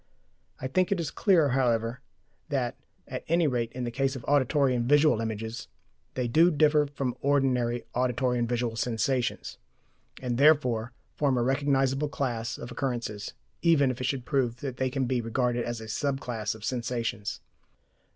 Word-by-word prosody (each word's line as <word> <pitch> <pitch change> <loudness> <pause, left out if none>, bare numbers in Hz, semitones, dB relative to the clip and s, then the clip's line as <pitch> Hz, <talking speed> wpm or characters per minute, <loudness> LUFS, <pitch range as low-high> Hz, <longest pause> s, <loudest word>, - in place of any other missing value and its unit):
I - - -6
think 185 +9 +1
it 195 - +1
is 160 -4 -2
clear, 170 -8 +3
however, 120 -1 +1 0.5
that, 130 -5 -1 0.3
at - - -5
any 170 +1 +3
rate 120 -5 0
in 125 - -4
the 120 - -2
case 135 +2 0
of 125 - -8
auditory 140 -1 +3
and 120 0 -1
visual 145 -5 +5
images, 110 +1 -4 0.5
they 125 -2 -1
do 160 +9 +5
differ 150 -2 +3
from 135 -3 -3
ordinary 125 -4 +1
auditory 125 0 +1
and 120 -1 0
visual 120 -1 -1
sensations, 120 +2 -1 0.6
and 125 -1 -2
therefore 125 -6 +4 0.2
form 140 -4 +1
a 120 - +2
recognizable 135 +1 +1
class 120 -5 -2
of 120 - -8
occurrences, 120 -6 -3 0.3
even 150 -6 +4
if 130 - -7
it - - -1
should 130 -1 -2
prove 130 -5 0
that 135 -3 -4
they 130 0 0
can 130 0 -1
be 125 -1 0
regarded 120 +1 0
as 120 -1 -3
a 110 - -8
sub 135 +5 -1
class 110 -5 -3
of 110 0 -8
sensations. 120 -4 -2
125 Hz, 170 wpm, -28 LUFS, 120-140 Hz, 0.6 s, visual